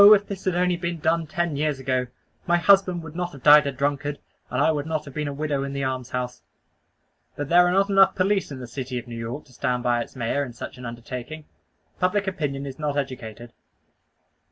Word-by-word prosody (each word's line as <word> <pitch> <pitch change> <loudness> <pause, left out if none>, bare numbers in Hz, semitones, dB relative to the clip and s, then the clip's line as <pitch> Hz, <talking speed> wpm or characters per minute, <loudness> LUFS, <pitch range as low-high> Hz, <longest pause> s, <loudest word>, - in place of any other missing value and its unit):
if 205 0 -1
this 195 -2 -6
had 185 -2 +1
only 180 0 +2
been 170 0 -3
done 160 +1 +1
ten 175 -2 -1
years 150 -1 0
ago, 130 -1 -1 0.4
my 175 0 +4
husband 185 -1 +4
would 160 -1 -10
not 180 0 -3
have 135 - -12
died 150 -1 +8
a - - 0
drunkard, 145 +2 -1 0.3
and - - -2
I 160 - +4
would 150 -1 -2
not 155 -1 -2
have 140 - -10
been 150 0 -2
a - - -2
widow 145 -1 -1
in 140 0 -4
the 140 0 -2
almshouse." 125 -1 -3 0.9
But 145 -1 -4
there 175 +1 +6
are - - +2
not 195 +2 +3
enough 195 0 +5
police 195 +1 +1
in 140 - -5
the 130 - -7
city 125 +1 -5
of 120 - -5
New 120 - -7
York 115 +5 -5
to 130 - -20
stand 125 0 -1
by 120 -1 +2
its - - -8
Mayor 130 +3 0
in 125 -4 -7
such 120 - -8
an 125 - -6
undertaking; 125 +6 -7 0.5
public 190 +2 +1
opinion 145 -7 -2
is 135 0 -7
not 145 -1 -1
educated. 120 -4 -5
145 Hz, 225 wpm, -24 LUFS, 130-170 Hz, 0.9 s, died